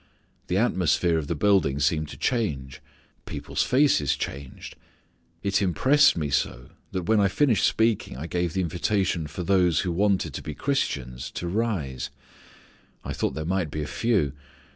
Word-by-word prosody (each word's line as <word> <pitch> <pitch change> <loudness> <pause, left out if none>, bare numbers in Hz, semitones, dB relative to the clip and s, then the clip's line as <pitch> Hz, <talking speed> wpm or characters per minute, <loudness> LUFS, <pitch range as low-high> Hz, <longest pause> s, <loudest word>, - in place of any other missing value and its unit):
The 90 - 0
atmosphere 90 -6 +2
of 75 - -5
the 85 - -1
building 80 -5 +2
seemed 75 +1 +1
to - - -9
change. 70 - -2 0.4
The - - -12
people's - - -3
faces 125 - +3
changed. 70 -2 -6 0.7
It 100 0 +1
impressed 130 - +4
me 75 -3 -2
so 70 0 -1 0.2
that 95 -2 -2
when 110 +5 +3
I 100 - +4
finished 115 0 +3
speaking 110 - 0
I 75 - -5
gave 85 -1 -1
the 95 - 0
invitation 90 0 0
for 90 - -6
those 90 -3 +3
who 90 - -2
wanted 95 -4 +1
to - - -5
be 75 - -6
Christians 70 - -2
to 90 - -4
rise. 90 - -2 1.0
I - - -3
thought - - -2
there 80 - -4
might 90 -2 0
be 75 +1 -3
a - - -4
few. 100 - 0
90 Hz, 165 wpm, -25 LUFS, 75-100 Hz, 1.0 s, impressed